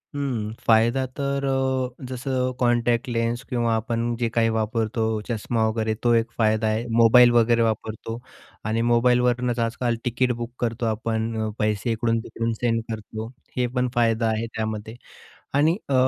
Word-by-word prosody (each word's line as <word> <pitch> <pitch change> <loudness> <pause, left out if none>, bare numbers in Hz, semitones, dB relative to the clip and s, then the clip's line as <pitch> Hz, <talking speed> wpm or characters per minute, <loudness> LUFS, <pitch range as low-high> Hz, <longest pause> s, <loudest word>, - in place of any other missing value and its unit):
हं, 125 -7 -2 0.2
फायदा 115 +4 +4
तर 140 -1 -1
अ, 130 -1 -1
जसं 130 0 -1
कॉन्टॅक्ट 120 0 +2
लेन्स 115 0 -1
किंवा 120 -3 +1
आपण 115 +1 -1
जे 120 -1 0
काही 115 0 +2
वापरतो, 110 0 -1 0.3
चष्मा 115 0 0
वगैरे 110 0 -1
तो 120 -1 +4
एक 115 +1 +1
फायदा 110 -1 +2
आहे. 110 +2 0
मोबाईल 120 +1 +7
वगैरे 115 0 +4
वापरतो 110 +1 -2 0.5
आणि 110 +2 0
मोबाईलवरूनच 125 0 +2
आजकाल 115 +1 0
तिकीट 125 +1 +1
बुक 120 0 -4
करतो 120 0 -1
आपण, 110 0 -1
पैसे 105 +2 0
इकडून-तिकडून 115 0 -1
सेंड 115 -1 +1
करतो. 110 0 -6 0.3
हे 125 - +2
पण 125 0 +2
फायदा 115 -1 +2
आहे 110 +1 0
त्यामध्ये 110 0 -4 0.6
आणि 155 +4 +3
अ, 140 - 0
115 Hz, 145 wpm, -24 LUFS, 110-125 Hz, 0.6 s, मोबाईल